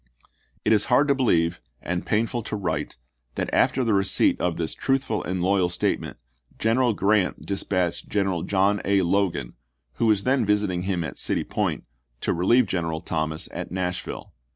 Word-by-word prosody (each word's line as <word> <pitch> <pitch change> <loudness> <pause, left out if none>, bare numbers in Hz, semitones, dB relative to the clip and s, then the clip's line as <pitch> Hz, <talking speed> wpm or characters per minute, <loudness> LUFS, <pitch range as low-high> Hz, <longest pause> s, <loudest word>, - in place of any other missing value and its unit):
It - - +4
is 105 -1 +3
hard 130 +4 +3
to - - +6
believe, 85 - +1 0.2
and 90 0 -3
painful 115 +2 0
to 110 - -5
write, 80 -7 -3 0.4
that - - -3
after 130 - +3
the 115 -3 +1
receipt 95 -1 +2
of 90 -2 0
this 80 -2 -2
truthful 135 -5 -1
and 90 0 -2
loyal 95 -1 +2
state 90 - 0
ment, - - -8 0.4
General 115 +1 +2
Grant 100 -1 +1
dispatched 95 -3 -2
General 95 -4 0
John 100 +2 +1
A. 100 -1 +2
Logan, 85 -9 0 0.4
who 115 - +2
was 105 -2 +3
then 130 -1 +2
visiting 105 -4 +1
him 90 -2 -1
at - - -5
City - - 0
Point, - - -2 0.4
to - - 0
relieve 115 +9 +4
General 80 -4 -2
Thomas 80 -1 -3
at - - -6
Nashville. 90 -1 -4
95 Hz, 170 wpm, -24 LUFS, 90-110 Hz, 0.4 s, to